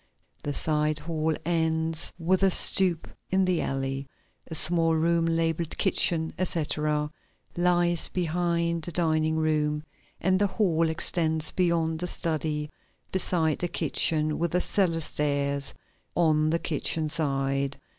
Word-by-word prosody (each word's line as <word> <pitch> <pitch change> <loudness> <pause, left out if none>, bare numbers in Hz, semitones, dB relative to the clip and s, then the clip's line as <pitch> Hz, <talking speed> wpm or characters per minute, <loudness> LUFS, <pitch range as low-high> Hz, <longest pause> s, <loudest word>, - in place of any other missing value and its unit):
The 145 -1 -4
side 150 -1 0
hall 160 0 -2
ends 160 -1 0
with 180 +2 0
a 195 - +4
stoop 180 -2 +5 0.2
in 190 0 +2
the 185 -2 0
alley. 135 0 -3 0.4
A 160 - -1
small 165 +1 +5
room 165 +1 +1
labeled 165 0 -1
kitchen, 165 -4 +1
etc. 150 -3 -1 0.4
lies 175 -1 +1
behind 170 -1 -1
the 175 - -6
dining 160 -1 +1
room 150 -1 0 0.4
and 185 +1 +1
the 205 - +2
hall 170 -6 0
extends 160 -1 +2
beyond 165 -3 0
the 180 - -3
study 155 -3 -2 0.4
beside 170 -4 0
the 175 - -1
kitchen 155 -2 0
with 170 -1 -1
the 180 - +2
cellar 175 -5 0
stairs 140 -2 -2 0.4
on 155 -2 +2
the 165 - +1
kitchen 160 0 -1
side. 140 -2 -1
160 Hz, 130 wpm, -26 LUFS, 155-170 Hz, 0.4 s, stoop